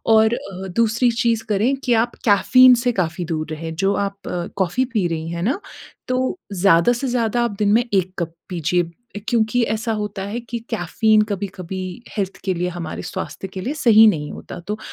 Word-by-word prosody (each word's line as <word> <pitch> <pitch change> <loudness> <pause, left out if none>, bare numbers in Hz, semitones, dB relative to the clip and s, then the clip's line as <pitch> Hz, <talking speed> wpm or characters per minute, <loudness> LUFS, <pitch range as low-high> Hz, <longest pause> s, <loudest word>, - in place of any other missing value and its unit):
और 220 +1 +5
अ, 190 -2 -7
दूसरी 230 +2 +3
चीज़ 230 -2 +1
करें 215 +7 +2
कि 245 - +1
आप 230 +1 +1
कैफ़ीन 250 +4 +6
से 245 +1 +1
काफ़ी 175 -3 -2
दूर 155 -2 -2
रहें, 160 +1 -5
जो 195 +3 +2
आप 200 0 -2 0.4
कॉफ़ी 195 +7 +1
पी 210 -6 +1
रही 160 -1 -3
हैं 170 0 -4
ना, 265 - 0 0.5
तो 255 +6 0
ज़्यादा 180 +2 +4
से 260 +3 -3
ज़्यादा 240 -1 +1
आप 235 - -1
दिन 205 -1 +2
में 240 +2 +4
1 185 -1 +1
कप 170 -2 -2 0.2
पीजिए 175 +5 -2
क्योंकि 235 +1 +2
ऐसा 225 +1 -2
होता 210 -2 -4
है 240 - -2
कि 235 0 -5
कैफ़ीन 215 +1 +2
कभी-कभी 190 -2 -4 0.4
हेल्थ 195 -2 -2
के 190 -2 0
लिए 180 +1 -1
हमारे 165 -2 -5
स्वास्थ्य 195 - -6
के 190 0 -7
लिए 275 +6 -2
सही 225 -1 +8
नहीं 150 -7 -1
होता, - - -9
तो 210 +5 -5
205 Hz, 190 wpm, -21 LUFS, 180-235 Hz, 0.5 s, सही